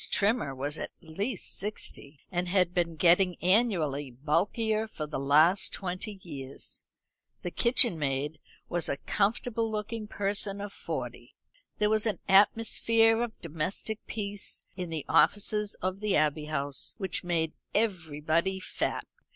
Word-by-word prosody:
Trimmer 200 - +1
was 145 +4 -3
at - - -4
least 195 +6 -4
sixty, 165 -8 -4
and 180 0 -1
had 180 -1 +2
been 170 -2 0
getting 175 +2 +4
annually 175 - +2
bulkier 200 - 0
for 155 -8 -5
the 150 -2 -4
last 155 +7 +4
twenty 190 +2 -5
years. 135 -5 -7 0.6
The 175 - -3
kitchen 235 - +6
maid 145 +2 -2 0.3
was 175 -2 0
a - - -1
comfortable 225 - 0
looking 215 +1 -4
person 200 0 -1
of 205 0 -6
forty. - - -6 0.4
There 210 0 +2
was 220 +1 +2
an 215 - 0
atmosphere 225 +3 +4
of 235 -2 -4
domestic 170 +7 -3
peace 205 -2 -3
in 180 -2 -5
the 160 -3 -4
offices 205 +6 +2
of 185 +1 -1
the 210 -2 0
Abbey 150 0 +1
House 145 -2 -2
which 190 -3 -1
made 165 -3 0 0.2
everybody 170 -3 0
fat. - - -3
185 Hz, 135 wpm, -29 LUFS, 155-210 Hz, 0.6 s, kitchen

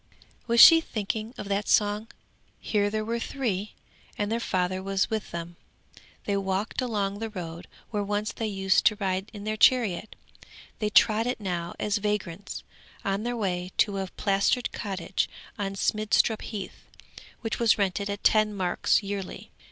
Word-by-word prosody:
Was 235 0 +3
she 330 +4 +10
thinking 215 -3 -3
of - - -6
that 200 +1 0
song? 210 +1 +2 0.5
Here 205 -1 +1
there 215 +1 -2
were 230 +1 -1
three 215 -6 -3 0.4
and 205 +1 -1
their 230 - +1
father 185 -4 -1
was 195 +1 0
with 220 -2 -2
them. 170 0 -6 0.7
They 200 - 0
walked 195 +5 -1
along 205 -5 -1
the 225 0 -3
road 170 -4 -7 0.2
where 210 -2 0
once 205 +1 -1
they 225 - -3
used 195 -2 +2
to 215 - +3
ride 190 -1 -2
in 205 -2 -9
their 215 +1 -2
chariot. 220 -4 +3 0.6
They 210 - 0
trod 220 +2 +4
it 250 - -1
now 175 -4 -3
as 210 0 0
vagrants, 205 -3 -3 0.4
on 195 +1 0
their 240 +1 -2
way 180 -3 -2
to 200 -2 +2
a 190 - -2
plastered 200 +5 +1
cottage 190 -3 -2 0.3
on 195 -1 -2
Smidstrup 215 +2 +2
Heath, 200 -4 -7 0.5
which 225 -1 -3
was 230 -2 +4
rented 200 0 0
at 200 0 -4
ten 215 -1 +4
marks 185 +2 +1
yearly. 200 -1 -5
205 Hz, 160 wpm, -27 LUFS, 195-215 Hz, 0.7 s, she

